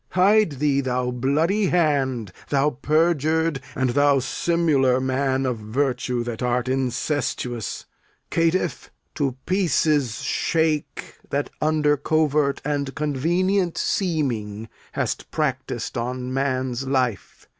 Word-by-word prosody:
Hide 200 -1 +4
thee, 140 0 +1
thou 125 -1 -1
bloody 155 - +1
hand; 135 - +1 0.2
Thou 145 +1 +2
perjur'd, 155 +1 +1
and 130 -2 +1
thou 145 +1 +4
simular 135 -2 +2
man 130 0 0
of 125 -3 -1
virtue 125 +2 -1
That 120 -1 -5
art 125 0 0
incestuous. 125 -2 -2 0.5
Caitiff, 165 +2 0 0.3
in 135 -3 +1
pieces 155 - +1
shake 160 -2 -1
That 140 +1 -2
under 150 -1 +2
covert 150 -1 +1
and 140 -2 -2
convenient 175 +6 0
seeming 115 - -1 0.2
Hast - - -2
practis'd 130 -5 -2
on 125 +1 -3
man's 130 -1 -1
life. 130 -6 -1
140 Hz, 105 wpm, -23 LUFS, 125-155 Hz, 0.5 s, Hide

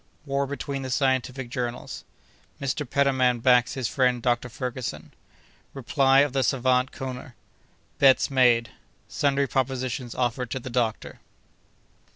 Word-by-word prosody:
—War 140 -1 -1
between 140 0 -4
the 130 - -5
Scientific 130 -1 -1
Journals.—Mr. 125 +2 -6
Petermann 130 -3 +2
backs 125 0 +3
his 130 -4 -2
Friend 125 -1 +1
Dr. 120 +1 0
Ferguson.—Reply 130 - -2
of 145 -2 0
the 135 - +1
Savant 130 +1 +1
Koner.—Bets 130 +1 -1
made.—Sundry 130 +3 0
Propositions 130 -2 -2
offered 125 0 -1
to 130 - -3
the 130 0 -8
Doctor. 120 -3 -2
130 Hz, 105 wpm, -25 LUFS, 125-135 Hz, -, backs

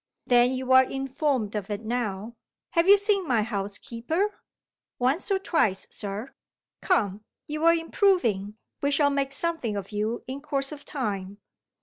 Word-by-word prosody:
"Then 245 +1 +4
you 260 0 -3
are 260 0 +8
informed 270 -4 -1
of 205 -1 -3
it 205 0 -3
now. 220 -2 -2 0.4
Have 335 +1 +2
you 405 - +9
seen 400 -3 +1
my 235 -5 +2
housekeeper?" 230 - -3 0.6
"Once 265 - +1
or 395 - +3
twice, 320 - +1
sir." 210 +5 -4 0.5
"Come! 210 - +1 0.2
you're 305 +2 +3
improving; 325 - +1 0.2
we 285 - +1
shall 285 0 +3
make 275 -1 0
something 290 -7 -1
of 200 0 -5
you 215 +3 -2
in 265 +2 -6
course 275 -2 -1
of 295 -1 -9
time. 205 -7 -3
260 Hz, 145 wpm, -26 LUFS, 210-305 Hz, 0.6 s, you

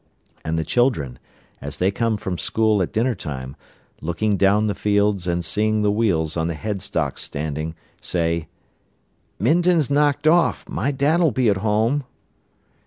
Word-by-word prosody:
And 80 +1 -2
the 80 - 0
children, 80 - 0 0.4
as 70 +1 -6
they 95 +4 +2
come 115 +1 0
from 95 -3 -4
school 110 -2 +1
at 90 - -1
dinner 115 +3 +1
time, 70 - -6 0.5
looking 95 +6 0
down 100 +2 +3
the 105 - 0
fields 100 -3 +1
and 85 -1 -1
seeing 110 +4 +1
the 105 - +3
wheels 90 -8 +1
on 80 -1 0
the 85 - -3
headstocks 95 -6 -3
standing, 75 +2 -4 0.3
say: 85 -2 -1 0.9
"Minton's 160 - +2
knocked 145 +1 +2
off. 170 +2 +3
My 170 -5 -1
dad'll 150 +5 +2
be 125 -4 +1
at 100 - +2
home." 110 +7 +1
105 Hz, 150 wpm, -22 LUFS, 85-120 Hz, 0.9 s, down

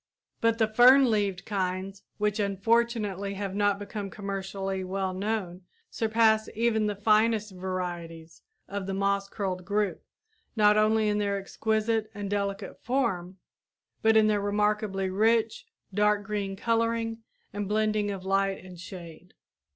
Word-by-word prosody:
But 230 0 +2
the 225 - +4
fern 250 +3 +6
leaved 200 -4 0
kinds, 190 -1 -3 0.2
which 210 0 0
unfortunately 205 -1 0
have 195 -1 -4
not 205 0 +2
become 205 0 -6
commercially 195 -1 -4
well 190 0 -2
known, 190 -2 -3 0.3
surpass 220 -1 +2
even 220 -1 +1
the 205 - -2
finest 215 +1 +2
varieties 175 -3 -6 0.3
of 200 -1 -5
the 195 - -2
moss 200 0 0
curled 185 -3 -3
group, 205 +1 -1 0.5
not 210 -1 +5
only 215 0 +3
in 210 0 +1
their 200 -1 0
exquisite 220 +2 -1
and 205 -1 -5
delicate 200 -1 -3
form, 195 -8 -1 0.6
but 220 0 +5
in 220 - +6
their 210 -1 +2
remarkably 205 -1 0
rich, 225 - +1 0.3
dark 210 +1 +2
green 200 -1 -3
coloring 230 +1 0 0.3
and 205 -1 -3
blending 215 0 +1
of 195 -2 -5
light 195 0 0
and 180 -2 -11
shade. 175 -1 -11
205 Hz, 135 wpm, -28 LUFS, 195-220 Hz, 0.6 s, fern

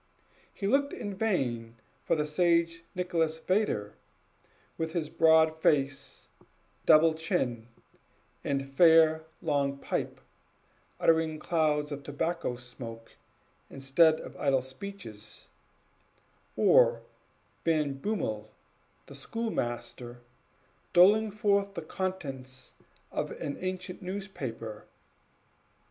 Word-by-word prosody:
He 200 - -6
looked 280 +7 +2
in 205 - -5
vain 125 - -1 0.3
for - - +2
the 150 -1 0
sage 165 +1 +2
Nicholas 170 -3 0
Vedder, 160 - 0 0.8
with 160 -1 -3
his 160 -4 -2
broad 160 -1 +4
face, 140 -3 0 0.6
double 160 +1 +7
chin, 145 - -2 0.8
and 135 -1 -1
fair 160 +2 +5 0.2
long 140 -3 0
pipe, - - -3 0.8
uttering 160 -1 +3
clouds 150 -2 0
of 145 0 -5
tobacco 145 -1 -2
smoke 120 -2 -9 0.6
instead 155 +4 +3
of - - -10
idle 135 -3 +2
speeches; 130 - -9 1.1
or - - +5 0.6
Van 155 -4 +1
Bummel, 135 - -3 0.6
the - - -12
schoolmaster, 125 - -4 0.7
doling 205 +5 +6
forth 200 -1 +1
the 170 - -4
contents 135 -9 -5 0.4
of - - -2
an 145 - -4
ancient 185 0 -5
newspaper. 145 - -6
155 Hz, 95 wpm, -29 LUFS, 135-180 Hz, 1.1 s, double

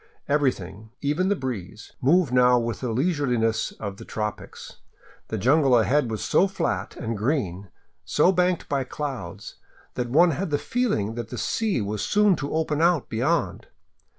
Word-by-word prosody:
Everything, 110 -8 -1
even 150 +7 0
the 205 - +2
breeze, 110 - -6
moved 150 0 +3
now 125 0 +5
with 115 -2 -2
the 125 -3 -3
leisureliness 125 -5 0
of 100 -2 -6
the - - -10
tropics. 105 -1 -6 0.5
The 110 - -3
jungle 135 +3 +4
ahead 130 +3 +2
was 110 -1 -4
so 195 - +3
flat 105 - -3
and 115 -1 -4
green, 100 - -2 0.3
so 185 - +3
banked 180 -1 +1
by 140 -2 0
clouds, 125 - -6 0.4
that 125 -1 -3
one 165 +7 +5
had 175 +5 -3
the 145 - +1
feeling 175 - -1
that 120 -1 -6
the 125 - -6
sea 200 - 0
was 105 0 -3
soon 210 -2 +3
to 140 - -4
open 155 -1 0
out 170 -4 +2
beyond. 140 +8 -1
130 Hz, 160 wpm, -25 LUFS, 110-160 Hz, 0.5 s, now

